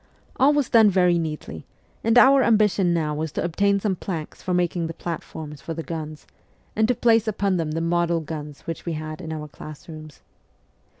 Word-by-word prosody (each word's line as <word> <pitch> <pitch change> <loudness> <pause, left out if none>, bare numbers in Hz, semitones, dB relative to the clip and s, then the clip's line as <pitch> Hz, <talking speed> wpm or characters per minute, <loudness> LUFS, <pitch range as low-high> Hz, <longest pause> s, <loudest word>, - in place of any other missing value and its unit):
All 270 +3 +5
was 290 -3 +1
done 220 -2 +6
very 180 -2 +3
neatly, 155 - -5 0.4
and 225 +2 +3
our 270 +2 +7
am 230 -3 +4
bition 205 -3 +2
now 165 -3 0
was 155 +1 -3
to - - -2
obtain 200 +4 +1
some 195 -1 0
planks 165 -4 -6
for 185 - -4
making 175 -1 0
the 165 - -7
platforms 155 -3 -7
for 165 - -5
the 165 - -4
guns, 155 -2 -6 0.5
and 220 0 +3
to 250 - +2
place 225 -1 +3
upon 200 -3 0
them 155 -2 -2
the 165 - -1
model 170 0 +1
guns 150 -2 -7
which 165 - -6
we 170 - -3
had 155 +2 -6
in 160 -2 -6
our 155 -1 -5
class 150 0 -11
rooms. 155 -2 -11
170 Hz, 200 wpm, -23 LUFS, 155-200 Hz, 0.5 s, our